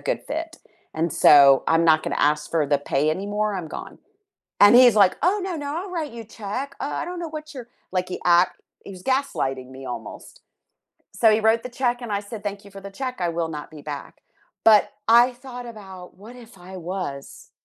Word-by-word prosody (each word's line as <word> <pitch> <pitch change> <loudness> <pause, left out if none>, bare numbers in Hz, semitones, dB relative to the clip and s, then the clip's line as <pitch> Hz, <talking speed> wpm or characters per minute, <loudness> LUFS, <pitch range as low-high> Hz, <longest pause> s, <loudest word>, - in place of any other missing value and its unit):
good - - -2
fit, 325 +2 -5 0.4
and 165 +2 -1
so 140 -2 +6
I'm 165 +1 +3
not 155 -1 +4
gonna - - -3
ask 150 0 -5
for 160 -3 +1
the 145 0 +2
pay 145 +1 -1
anymore, 205 +4 -2
I'm 180 -4 -5
gone," - - -9 0.6
and 205 +2 +8
he's 245 -3 +7
like, 200 -3 +4
"Oh, 390 +4 +2
no, 370 -2 -3
no, 290 -1 -5
I'll 370 +2 -6
write 320 -5 -4
you 235 - -7
a - - -18 0.2
check, 260 +8 -4
uh, 285 - -3
I - - -4
don't 355 0 -6
know 340 - -4
what 310 0 -8
your" 245 -3 -8 0.2
like 185 -1 -1
he - - -5
act 175 +1 +3 0.2
he - - -9
was 185 -1 -12
gaslighting 135 - -1
me 135 0 -10
almost. 120 -3 -9 0.7
So, 225 -2 +4
he 215 - +3
wrote 225 +1 +2
the 250 - -6
check, 245 0 -1
and 235 -3 -6
I 200 - 0
said, 205 0 -9
"Thank 205 -1 -5
you - - -13
for 195 0 -11
the 200 0 -9
check, 255 -2 -4
I 175 - 0
will 165 0 -2
not 150 - -9
be 155 -2 -11
back," 145 -1 -8 0.4
but 215 -2 +7 0.2
I 240 +2 +6
thought 245 0 -10
about 190 -5 -11
what 230 +4 -12
if 230 -4 -15
I 185 +1 -10
was 175 -6 -7
205 Hz, 220 wpm, -23 LUFS, 165-250 Hz, 0.7 s, and